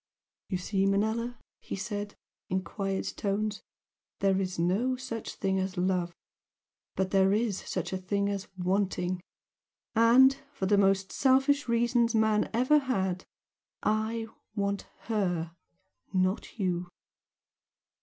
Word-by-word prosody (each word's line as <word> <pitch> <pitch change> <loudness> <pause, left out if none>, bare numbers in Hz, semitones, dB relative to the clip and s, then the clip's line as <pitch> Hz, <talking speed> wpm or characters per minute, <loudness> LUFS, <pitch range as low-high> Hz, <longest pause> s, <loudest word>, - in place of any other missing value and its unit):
"You 185 - 0
see, 195 +1 0
Manella?" 220 +4 0 0.2
he - - -6
said, 205 +1 -4 0.3
in 185 0 0
quiet 195 -1 -3
tones 205 +1 -1 0.6
"There 195 -1 +2
is 185 -1 -3
no 195 +10 +1
such 250 -3 -6
thing 190 0 0
as 190 0 -3
'love,' 180 -1 0 0.8
but 190 0 0
there 195 0 +4
is 215 -2 +1
such - - -3
a 190 - -1
thing 200 +2 0
as 200 0 -3
'wanting.' 185 -1 0 0.7
And 245 +4 +6 0.2
for 195 - -2
the 205 +2 +4
most 195 -1 +3
selfish 270 +1 +3
reasons 235 0 +2
man 220 -1 +3
ever 255 +6 +4
had 190 -9 -1 0.6
I 220 +1 0 0.3
want 200 -1 -1
HER 180 -7 -1 0.6
not 185 +4 0
you!" 180 -3 -1
200 Hz, 125 wpm, -29 LUFS, 190-230 Hz, 0.8 s, And